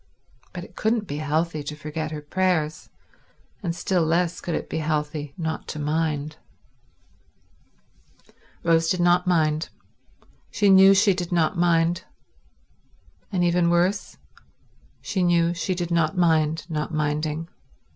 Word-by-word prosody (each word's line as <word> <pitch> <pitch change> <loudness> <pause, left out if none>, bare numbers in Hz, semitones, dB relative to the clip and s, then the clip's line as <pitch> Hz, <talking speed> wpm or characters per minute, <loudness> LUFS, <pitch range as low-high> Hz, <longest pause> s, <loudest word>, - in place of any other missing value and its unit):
But - - -7
it - - -14
couldn't 220 0 0
be 145 -5 -5
healthy 155 +1 -1
to 145 +1 -6
forget 155 +1 -5
her 150 -1 -7
prayers, 165 -2 -1 0.7
and 170 -4 -3
still 180 0 0
less 170 +2 0
could 170 - -3
it - - -4
be 160 - -3
healthy 150 -2 -3
not 160 -2 -4
to - - -5
mind. 150 0 -2 2.3
Rose 165 -1 +3
did 185 - 0
not 175 +1 +3
mind. 155 -2 +1 0.8
She 205 -2 +3
knew 195 +1 +8
she 200 0 +4
did 180 -1 -5
not 170 0 +1
mind. 170 0 +2 1.3
And, 180 -3 0
even 175 0 +2
worse, 180 +4 0 0.9
she 190 - -2
knew 170 -1 +3
she 180 +2 -2
did 175 -1 -4
not 165 0 +1
mind 160 -2 +2
not 155 -1 -3
minding. 155 +1 -2
165 Hz, 135 wpm, -24 LUFS, 155-180 Hz, 2.3 s, knew